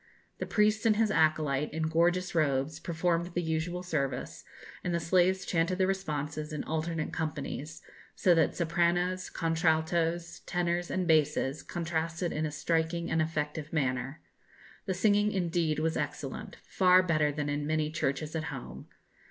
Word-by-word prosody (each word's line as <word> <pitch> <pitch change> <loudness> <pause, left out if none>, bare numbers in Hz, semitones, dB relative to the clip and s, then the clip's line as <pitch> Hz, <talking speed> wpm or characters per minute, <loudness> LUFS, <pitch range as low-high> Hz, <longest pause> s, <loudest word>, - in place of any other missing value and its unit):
The - - -3
priest 215 +1 +2
and 215 - +4
his 215 0 +2
acolyte, 155 -4 +2
in 160 +2 -2
gorgeous 175 +3 +2
robes, 145 -2 +1
performed 170 0 0
the 175 - +1
usual 165 +2 -2
service, 140 -7 -3 0.4
and 175 -1 -1
the - - +1
slaves 185 +3 +2
chanted 170 +1 +1
the 190 - +3
responses 150 -5 -3
in 150 - -3
alternate 160 0 -2
companies, 155 -1 -4 0.3
so 180 - +4
that 165 -1 +2
sopranos, 175 +2 +1
contraltos, 165 +1 0
tenors, 175 0 0
and 185 -2 -1
basses, 150 -3 +2
contrasted 165 0 -2
in 155 +1 -1
a - - -5
striking 165 +2 -1
and 160 - +2
effective 155 -1 -2
manner. 135 -1 -1 0.6
The 190 - 0
singing, 205 +2 +3
indeed, 170 -4 0
was 160 +1 0
excellent; 145 -2 -4
far 185 -1 +5
better 155 -4 +2
than 145 0 -3
in 145 0 -2
many 155 -1 0
churches 150 +1 -2
at 160 -1 -2
home. 120 - -7
160 Hz, 150 wpm, -30 LUFS, 150-175 Hz, 0.6 s, far